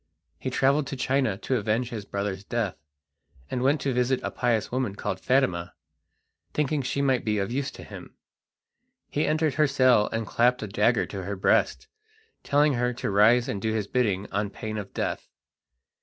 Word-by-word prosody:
He 130 - -3
travelled 135 +3 +2
to 135 - -4
China 130 -5 0
to 130 +4 -1
avenge 115 +3 -1
his 110 -4 -5
brother's 100 -1 -3
death, 110 -2 -2 0.8
and 125 - -1
went 140 +4 +3
to 135 -1 0
visit 125 +1 +1
a - - -2
pious 115 -3 0
woman 125 -5 -1
called 95 -2 -3
Fatima, 95 -11 +1 0.8
thinking 150 0 +1
she 140 +2 -1
might 130 -3 +2
be 105 -1 0
of 100 +2 -1
use 135 +2 -1
to - - -11
him. - - -11 1.0
He 150 - 0
entered 155 -1 +1
her 150 +2 +3
cell 130 -6 +4
and 115 0 -2
clapped 120 +3 +2
a - - -3
dagger 105 +2 +2
to 100 - -6
her 100 +1 -3
breast, 95 - +2 0.6
telling 145 +1 +3
her 125 0 0
to 120 - -3
rise 110 +5 +5
and 100 - -3
do 110 +1 0
his 105 -2 -1
bidding 100 -4 0
on 100 +1 -1
pain 110 +1 -5
of 100 -1 -7
death. - - -3
120 Hz, 185 wpm, -26 LUFS, 105-135 Hz, 1.0 s, rise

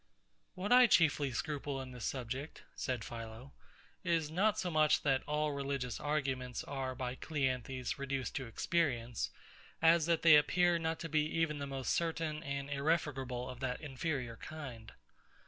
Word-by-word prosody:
What 190 +4 -3
I 250 0 +9
chiefly 150 - +4
scruple 145 0 -3
in 130 -1 -6
this 125 -2 -6
subject, 130 +3 -4
said 125 -5 -2
PHILO, 115 +3 -8 0.5
is 165 -4 +1
not 205 +5 +2
so 180 -4 -1
much 155 -1 +4
that 135 -2 +3
all 150 0 +1
religious 140 -3 -2
arguments 135 -4 -1
are 135 -2 -3
by 125 0 -3
CLEANTHES 130 -3 -2
reduced 135 -1 -2
to 130 - -4
experience, 120 -3 0 0.5
as 165 0 +5
that 170 -1 +2
they 155 -3 +9
appear 175 +3 +3
not 160 0 -1
to 165 - -3
be 155 0 +3
even 155 -2 +1
the 140 - -3
most 135 -3 -1
certain 165 -2 -1
and 140 -3 -3
irrefragable 140 -4 -1
of 125 -1 -7
that 125 -1 -2
inferior 135 -4 -3
kind. 125 -9 -8
140 Hz, 155 wpm, -34 LUFS, 130-160 Hz, 0.5 s, I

